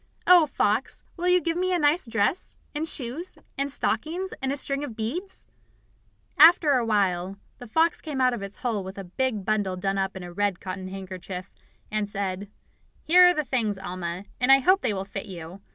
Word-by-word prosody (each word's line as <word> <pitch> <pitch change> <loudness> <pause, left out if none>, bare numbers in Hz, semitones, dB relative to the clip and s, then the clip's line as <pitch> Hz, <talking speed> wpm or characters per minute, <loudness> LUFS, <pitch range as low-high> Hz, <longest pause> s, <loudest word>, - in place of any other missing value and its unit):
Oh, 355 -3 +7
Fox, 220 -2 +1
will 355 0 -2
you 360 0 +5
give 335 -1 -2
me 370 +1 0
a 360 - +2
nice 295 -2 +2
dress, 230 - -1 0.2
and 305 +2 -2
shoes 285 +6 -4 0.2
and 280 +1 -2
stockings, 350 +7 -2
and 265 0 -1
a 280 - -1
string 275 +1 0
of 255 -6 -6
beads?" 315 - -4 0.9
After 320 -1 +8
a - - +4
little 235 -2 -1
while 190 -3 +1 0.2
the 245 - -9
fox 325 +9 +2
came 300 -4 -5
out 255 -1 +3
of 235 - -4
its 200 0 -7
hole 225 -5 -2
with 190 +1 -8
a 195 - -5
big 210 +2 -2
bundle 205 -3 0
done 195 +1 -1
up 190 0 -2
in 185 - -7
a 175 0 -9
red 200 -1 0
cotton 185 0 -6
handkerchief, 185 -1 -7 0.4
and 210 -1 -1
said: 195 0 -4 0.5
"Here 360 +3 +7
are 355 - +5
the 305 - -1
things, 225 -7 0
Alma, 185 -1 -5
and 250 +2 +3
I 270 - +9
hope 370 +9 +3
they 245 - 0
will 195 -1 -3
fit 195 +2 -6
you. 180 0 -9
220 Hz, 205 wpm, -26 LUFS, 195-300 Hz, 0.9 s, I